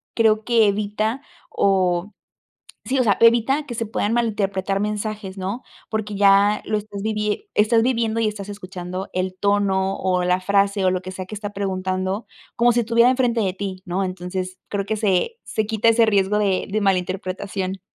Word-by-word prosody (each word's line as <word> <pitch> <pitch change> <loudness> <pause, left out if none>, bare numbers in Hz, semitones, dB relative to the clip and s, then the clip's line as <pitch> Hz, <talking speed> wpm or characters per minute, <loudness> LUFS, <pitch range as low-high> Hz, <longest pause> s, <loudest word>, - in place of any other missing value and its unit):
creo 220 -1 +3
que 230 -2 +4
evita 210 +5 -1 0.3
o 190 0 +1 0.7
sí, 265 +1 0
o - - +4
sea, 205 -3 +3
evita 235 +5 +4
que 240 - -6
se 230 -1 -2
puedan 210 0 -1
malinterpretar 200 -4 0
mensajes, 210 -1 -3
¿no?, 195 +6 -4 0.3
porque 215 -1 -3
ya 200 +1 +4
lo 215 - 0
estás 205 -1 -7
vivie 215 - -2
estás 225 +2 +4
viviendo, 230 -2 0
y 220 - +2
estás 205 -1 -6
escuchando 185 -1 -6
el 185 0 -2
tono, 195 -1 +1
o 180 -1 0
la 180 +1 +2
frase, 200 +1 +1
o - - +4
lo 185 0 -1
que 185 +1 -7
sea 185 0 -6
que 215 - -8
está 205 0 -5
preguntando, 190 0 -2 0.3
como 240 0 +4
si 240 - +2
estuviera 235 +2 +4
en 260 - +1
frente 240 -3 +1
de 190 -2 0
ti, 190 -1 -5
¿no?, 185 +2 -1
entonces, 185 0 -5
creo 200 -1 -2
que 220 - -1
se 210 - 0
se 220 - -2
quita 220 +1 +1
ese 230 0 +5
riesgo 205 -1 +2
de 195 -3 +1
de 215 - 0
mal 195 -2 +4
interpretación. 185 +1 -4
205 Hz, 185 wpm, -22 LUFS, 190-220 Hz, 0.7 s, ese